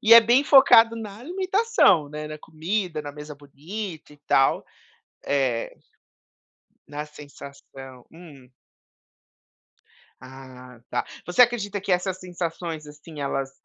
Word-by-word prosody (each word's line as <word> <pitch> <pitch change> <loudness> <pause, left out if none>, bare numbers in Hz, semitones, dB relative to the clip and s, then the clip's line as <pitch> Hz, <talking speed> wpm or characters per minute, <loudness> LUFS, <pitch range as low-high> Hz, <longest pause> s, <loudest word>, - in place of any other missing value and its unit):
E 230 +2 +8
é 230 - +11
bem 240 +5 +3
focado 235 -5 +7
na 215 -3 -8
alimentação, 370 - +2
né, 150 +1 -7
na 155 0 -8
comida, 160 +1 -3
na 145 - -7
mesa 150 +1 -10
bonita 155 +4 -8
e - - -17
tal? 135 - +3 0.6
É. 130 -5 -1 1.1
Na 150 +1 -6
sensação. 140 -3 -13
Hum? 150 -7 -15 1.7
A, 130 -1 -13
tá. - - -2 0.2
Você 180 +7 +3
acredita 215 -4 -1
que 195 0 -4
essas 180 +1 0
sensações, 170 -3 -5
assim, 150 +1 -12
elas, 135 -1 -3
160 Hz, 120 wpm, -24 LUFS, 145-205 Hz, 1.7 s, é